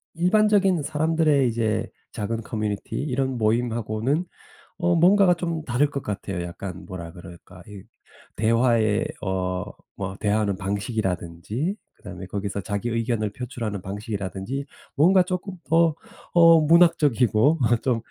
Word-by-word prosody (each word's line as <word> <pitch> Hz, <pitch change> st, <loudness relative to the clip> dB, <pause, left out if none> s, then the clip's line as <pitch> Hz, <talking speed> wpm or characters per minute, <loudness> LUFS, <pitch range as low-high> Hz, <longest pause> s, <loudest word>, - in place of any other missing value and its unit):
일반적인 195 Hz, 0 st, +3 dB
사람들의 155 Hz, -2 st, +2 dB
이제 110 Hz, -1 st, -1 dB, 0.2 s
작은 115 Hz, 0 st, -3 dB
커뮤니티 105 Hz, -2 st, -4 dB
이런 130 Hz, -2 st, -1 dB
모임하고는 115 Hz, -, 0 dB, 0.5 s
어 175 Hz, 0 st, +2 dB
뭔가가 180 Hz, +2 st, +5 dB
좀 165 Hz, -2 st, -3 dB
다를 135 Hz, +3 st, +1 dB
것 140 Hz, -1 st, -4 dB
같아요. 100 Hz, -3 st, -4 dB
약간 90 Hz, +1 st, -7 dB
뭐라 85 Hz, -3 st, -8 dB
그럴까? 85 Hz, +1 st, -13 dB
이 100 Hz, -2 st, -10 dB, 0.5 s
대화의 115 Hz, 0 st, +2 dB, 0.2 s
어 95 Hz, -1 st, -2 dB, 0.4 s
뭐 95 Hz, 0 st, -4 dB
대화하는 105 Hz, -1 st, +1 dB
방식이라든지 100 Hz, -, -3 dB, 0.2 s
그다음에 95 Hz, -2 st, -9 dB
거기서 100 Hz, +1 st, -4 dB
자기 100 Hz, +4 st, -3 dB
의견을 115 Hz, -2 st, -1 dB
표출하는 115 Hz, -5 st, -5 dB
방식이라든지 100 Hz, +5 st, -5 dB, 0.3 s
뭔가 180 Hz, +5 st, +5 dB
쪼끔 185 Hz, +1 st, -4 dB
더 165 Hz, -1 st, +3 dB, 0.4 s
어 165 Hz, -1 st, +7 dB
문학적이고 150 Hz, -5 st, +4 dB, 0.2 s
좀 125 Hz, -4 st, +1 dB
115 Hz, 300 characters per minute, -24 LUFS, 100-155 Hz, 0.5 s, 어